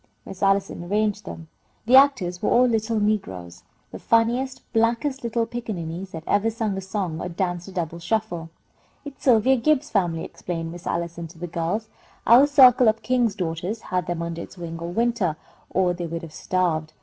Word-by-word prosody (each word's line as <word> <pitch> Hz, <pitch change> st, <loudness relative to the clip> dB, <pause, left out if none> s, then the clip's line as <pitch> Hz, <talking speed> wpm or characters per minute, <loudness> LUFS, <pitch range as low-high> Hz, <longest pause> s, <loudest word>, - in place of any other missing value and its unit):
Miss 190 Hz, -, -10 dB
Allison 195 Hz, -2 st, +1 dB
arranged 210 Hz, +2 st, -1 dB
them. 165 Hz, -3 st, -8 dB, 0.4 s
The 245 Hz, +3 st, +5 dB
actors 250 Hz, -11 st, +4 dB
were -, -, +1 dB
all 250 Hz, +1 st, +5 dB
little 225 Hz, -2 st, 0 dB
negroes, 95 Hz, -, -2 dB, 0.3 s
the -, -, -8 dB
funniest, 240 Hz, +4 st, +1 dB
blackest 235 Hz, +4 st, +1 dB
little 235 Hz, 0 st, 0 dB
pickaninnies 190 Hz, -7 st, -5 dB
that 160 Hz, -3 st, -8 dB
ever 205 Hz, +2 st, +2 dB
sung 220 Hz, -3 st, -2 dB
a 195 Hz, -, -4 dB
song 190 Hz, -4 st, -3 dB
or 180 Hz, -, -4 dB
danced 175 Hz, 0 st, -3 dB
a -, -, -9 dB
double 170 Hz, -2 st, -4 dB
shuffle. 175 Hz, -4 st, -2 dB, 0.6 s
"It's 285 Hz, -2 st, -10 dB
Sylvia 255 Hz, +1 st, +5 dB
Gibbs's 300 Hz, +3 st, +1 dB
family," 175 Hz, -5 st, 0 dB
explained 165 Hz, -2 st, -5 dB
Miss 175 Hz, 0 st, -9 dB
Allison, 170 Hz, 0 st, -3 dB
to 165 Hz, +1 st, -16 dB
the 175 Hz, -, -5 dB
girls. 175 Hz, +6 st, -2 dB, 0.4 s
"Our 250 Hz, +5 st, +7 dB
circle 255 Hz, -4 st, +7 dB
of 220 Hz, +1 st, +2 dB
King's 245 Hz, -5 st, +1 dB
Daughters 180 Hz, +4 st, -3 dB
had 180 Hz, -3 st, -2 dB
them 170 Hz, -1 st, -2 dB
under 170 Hz, 0 st, -4 dB
its -, -, -11 dB
wing 165 Hz, -1 st, -6 dB
all 170 Hz, +1 st, -5 dB
winter, 230 Hz, -5 st, 0 dB, 0.3 s
or 180 Hz, -1 st, +1 dB
they 175 Hz, -1 st, -5 dB
would 165 Hz, +1 st, -5 dB
have 160 Hz, -2 st, -9 dB
starved. 160 Hz, -5 st, -1 dB
195 Hz, 185 wpm, -24 LUFS, 170-230 Hz, 0.6 s, Our